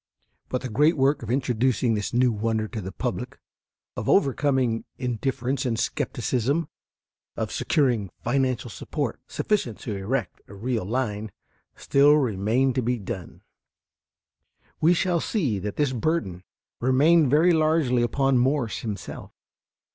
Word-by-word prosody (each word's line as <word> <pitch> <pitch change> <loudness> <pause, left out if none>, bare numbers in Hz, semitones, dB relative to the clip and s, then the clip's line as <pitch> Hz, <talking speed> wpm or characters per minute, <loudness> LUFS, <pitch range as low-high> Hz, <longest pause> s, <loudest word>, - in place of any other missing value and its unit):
But 125 - -2
the 130 - -4
great 150 +9 +3
work 135 +2 +2
of 115 - -7
introducing 125 -2 +1
this 105 -1 -2
new 125 0 +3
wonder 110 0 -1
to 110 0 -5
the 95 0 -6
public, - - -4 0.6
of - - -3
overcoming 130 -4 +2
indifference 130 +2 -2
and 120 -4 -1
skepticism, 135 +8 -1 0.7
of - - -2
securing 120 - +1
financial 130 -1 0
support - - -4
sufficient 190 - -1
to 110 - -4
erect 100 +3 -3
a 100 - -12
real 115 0 -2
line, 110 -2 -2 0.4
still 140 +1 +4
remained 125 0 +1
to 130 - 0
be 125 +1 0
done. 95 -4 -7 1.4
We 170 +3 +4
shall 175 -1 +1
see 145 - -1
that 105 +2 -4
this 145 -3 +1
burden 115 - -1 0.4
remained 140 +5 +4
very 160 +6 +5
largely 155 -6 +2
upon 135 +2 +2
Morse 130 -3 0
himself. 105 -4 -6
125 Hz, 130 wpm, -25 LUFS, 110-140 Hz, 1.4 s, very